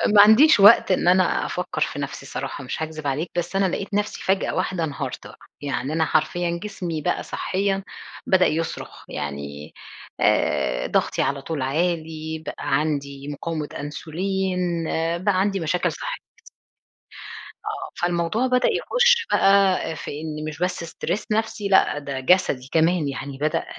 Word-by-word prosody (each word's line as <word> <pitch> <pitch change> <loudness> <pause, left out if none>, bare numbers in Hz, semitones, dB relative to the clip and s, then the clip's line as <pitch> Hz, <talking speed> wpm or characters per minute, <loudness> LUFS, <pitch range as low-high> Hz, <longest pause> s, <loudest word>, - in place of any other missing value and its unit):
ما 205 - +10
عنديش 225 +6 +7
وقت 205 0 +7
إن 180 - +1
أنا 185 0 +3
أفكر 175 -4 -4
في 145 - -1
نفسي 140 -1 -5
صراحة 140 +1 -5
مش 130 - -5
هاكذب 155 -2 -5
عليك، 150 +5 -2
بس 175 +2 -2
أنا 195 - +3
لقيت 195 +2 -3
نفسي 205 +1 -1
فجأة 190 +1 0
واحدة 185 -3 -1
انهارت 145 -4 -4
بقى. - - -15 0.2
يعني 135 +1 -2
أنا 160 0 +2
حرفيًا 170 +2 0
جسمي 180 -6 -4
بقى - - -1
صحيًا 195 +1 -1 0.4
بدأ 185 -1 +5
يصرخ 160 +1 -4
يعني 70 +1 -6 0.5
آآ - - +1
ضغطي - - 0
على 140 0 -1
طول 150 -1 -4
عالي، 160 +1 -2
بقى - - -5 0.2
عندي 140 -2 -3
مقاومة 150 +1 -4
أنسولين، 175 +3 -2
آآ 165 +1 0
بقى 185 +1 +1
عندي 195 0 +1
مشاكل 170 +2 0
صح - - -5 1.5
آه، - - -5
فالموضوع 175 +8 +1
بدأ 250 0 +3
يخُش 485 -2 +3
بقى 195 -1 +4 0.2
في 145 -1 -6
إن 155 -1 -5
مش 155 +1 -6
بس 180 -1 -1
stress 185 +5 -3
نفسي 215 -1 -1
لأ، 190 -6 +4
ده 140 -2 -5
جسدي 130 -3 +2
كمان 165 -1 +2
يعني 140 0 -5
بدأ 155 +2 -1
170 Hz, 150 wpm, -23 LUFS, 150-190 Hz, 1.5 s, ما